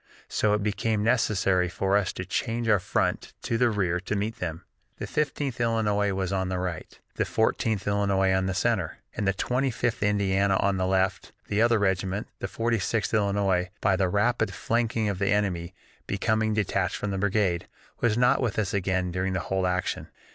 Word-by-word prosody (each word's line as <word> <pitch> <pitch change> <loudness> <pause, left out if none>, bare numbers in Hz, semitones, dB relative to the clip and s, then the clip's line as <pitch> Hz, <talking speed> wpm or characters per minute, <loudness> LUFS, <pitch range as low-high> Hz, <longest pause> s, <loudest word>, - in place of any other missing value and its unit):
So 105 -1 +2
it 105 - -2
became 105 0 0
necessary 100 -6 +2
for 95 +3 0
us 100 -2 +2
to 90 - -5
change 115 +4 -2
our 105 -3 +4
front - - -1
to 115 - -1
the 120 +1 +3
rear 90 -5 0
to 95 +3 -3
meet 105 +3 -2
them. 85 -1 -4 0.3
"The - - -4
Fifteenth 145 -4 -2
Illinois 105 -3 +1
was 95 -1 -2
on 95 -1 -1
the 95 - -1
right, 90 -3 -5 0.2
the - - +2
Fourteenth 110 -2 0
Illinois 100 -1 +2
in 95 0 +1
the 95 - -2
center, - - 0 0.2
and 100 - -1
the 95 - +3
Twenty 125 +7 0
fifth 120 -1 -1
Indiana 100 -1 +2
on 100 0 +1
the 95 0 0
left, 95 0 0 0.2
the 105 +1 +1
other 115 0 +4
regiment, 95 0 -1
the - - -3
Forty 115 0 0
sixth 110 +5 -1
Illinois, 100 -3 +1
by 95 -2 +2
the 95 -1 +1
rapid 105 0 +1
flanking 115 -1 0
of 100 -2 -2
the 100 - +1
enemy 95 -3 0 0.3
becoming 110 +2 +1
detached 95 -3 0
from 105 - -3
the 95 - -2
brigade, 95 -3 +1 0.3
was 115 -2 +2
not 125 +2 +4
with 120 -5 -1
us 105 -4 0
again 95 -2 0
during 95 +1 -1
the 95 - 0
whole 95 +1 -1
action. 90 0 -2
100 Hz, 190 wpm, -27 LUFS, 95-110 Hz, 0.3 s, our